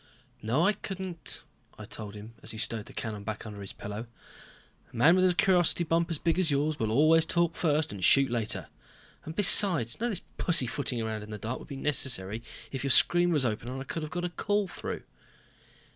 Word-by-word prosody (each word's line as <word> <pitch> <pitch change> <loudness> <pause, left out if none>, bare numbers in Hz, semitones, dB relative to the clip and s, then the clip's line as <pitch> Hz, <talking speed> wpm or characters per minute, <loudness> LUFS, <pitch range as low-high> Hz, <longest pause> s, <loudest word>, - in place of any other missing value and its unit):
"No 125 +10 0
I 210 - +3
couldn't," 190 -4 -5 0.3
I 110 - -9
told 105 -1 -8
him, 105 +2 -11
as - - -9
he 110 - -7
stowed 110 -1 -2
the - - -13
cannon 105 -3 -6
back 110 +1 -6
under 105 -2 -9
his 100 - -7
pillow. 105 +3 -8 0.8
"A - - -16
man 145 +9 +5
with 185 0 +3
a 175 - -1
curiosity 175 -2 +2
bump 165 +1 0
as 165 - -2
big 165 +3 -1
as 180 -4 +2
yours 145 +2 -1
will 110 - -1
always 155 +7 +4
talk 170 0 0
first 155 -1 0
and 100 -3 -8
shoot 135 +5 +4
later. 110 -2 -1 0.6
And 160 - -8
besides 180 - +8
none 240 +2 -1
of - - -3
this - - -11
pussyfooting 135 -5 -1
around 110 -1 -4
in 105 - -11
the 105 - -6
dark 115 +5 -5
would - - -13
be 140 - -8
necessary 120 -7 -2 0.3
if 135 -1 -5
your 140 - -2
screen 175 +5 +4
was 145 -5 +1
open 110 0 -3
and 130 +1 -6
I - - -6
could 165 +4 -5
have 155 - -6
got 175 0 -3
a - - -3
call 205 +3 -1
through." - - -7
140 Hz, 220 wpm, -28 LUFS, 110-170 Hz, 0.8 s, besides